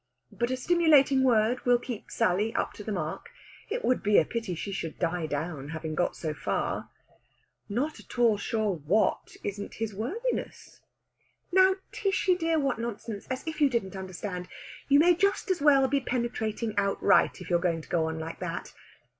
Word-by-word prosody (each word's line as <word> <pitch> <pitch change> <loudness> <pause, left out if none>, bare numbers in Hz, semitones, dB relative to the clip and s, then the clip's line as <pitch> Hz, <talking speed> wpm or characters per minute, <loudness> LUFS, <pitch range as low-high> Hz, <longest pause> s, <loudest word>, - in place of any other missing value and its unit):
But 240 +1 -1
a 255 - -1
stimulating 295 -3 +4
word 240 -1 +3
will 245 -1 +4
keep 240 -3 -7
Sally 215 +1 +1
up - - -1
to 210 - -9
the 215 - -4
mark. 175 - -4 0.4
It 475 +3 -2
would 255 - +2
be 210 -1 +3
a - - +5
pity 225 -7 -3
she 200 +5 -5
should 165 -4 -4
die 170 -2 -1
down, 145 -1 -4
having 160 0 -4
got 175 +3 0
so 155 -2 -3
far. - - -2 0.8
"Not 275 +9 -2
at - - -12
all 235 -3 +5
sure 215 -1 0
what 170 +9 0
isn't 205 0 -5
his 225 -1 -3
worthiness!" 380 - -4 0.7
"Now, 375 +1 +5 0.2
Tishy 385 -2 +1
dear, 330 -2 +1
what 275 -5 0
nonsense! 225 -2 -5
As 260 +2 -4
if 320 -1 -4
you 285 - +6
didn't 210 -6 -2
understand! 185 -1 -5 0.4
You 280 - +7
may 345 +4 +6
just 395 +2 +1
as 360 - -1
well 275 -2 +5
be 280 +1 +1
penetrating 230 -3 -2
outright, 200 0 +3
if 180 -1 -8
you're 175 - +4
going 170 -2 0
to - - -16
go 160 -2 +1
on 160 0 -3
like 160 +1 -6
that. 175 -1 -5
225 Hz, 180 wpm, -28 LUFS, 180-275 Hz, 0.8 s, You